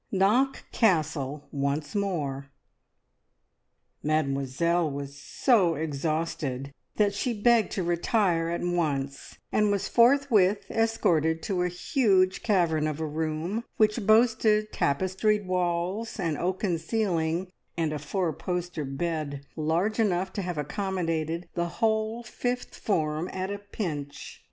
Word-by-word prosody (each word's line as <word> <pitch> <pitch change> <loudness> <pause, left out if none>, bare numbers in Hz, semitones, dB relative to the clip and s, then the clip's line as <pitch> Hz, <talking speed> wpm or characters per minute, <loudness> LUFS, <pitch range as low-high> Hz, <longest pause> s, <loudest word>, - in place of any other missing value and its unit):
KNOCK 215 +8 +2
CASTLE 155 - +1
ONCE 140 +1 -2
MORE. 150 -9 -2 1.5
Mademoiselle 155 +3 +1
was 140 0 -6
so 180 - +2
exhausted 150 -3 -2 0.2
that 205 -1 +2
she 225 +1 -2
begged 235 0 +4
to 190 - -1
retire 175 0 +1
at 170 - -2
once, 145 -6 -2
and 210 -1 +3
was 200 -1 0
forthwith 235 -6 +4
escorted 165 -8 +1
to 190 -4 -1
a 180 - +2
huge 185 0 +2
cavern 170 -8 +2
of 155 0 -3
a 160 - -1
room, 160 +7 -2
which 215 -1 +2
boasted 215 -1 +4
tapestried 190 +7 +1
walls, 180 +5 -1
an 165 -5 0
oaken 180 +1 -1
ceiling, 175 -2 -1 0.3
and 160 -2 0
a 150 - -3
four 165 +3 -1
poster 175 -1 -3
bed 145 0 -3
large 170 +8 0
enough 190 -3 +1
to 200 - -2
have 180 -3 -4
accommodated 165 0 -2
the 170 0 -1
whole 220 +1 0
fifth 245 +2 -3
form 155 -3 -1
at 190 +1 -3
a 205 - -4
pinch. 155 -9 -6
175 Hz, 120 wpm, -27 LUFS, 155-205 Hz, 1.5 s, begged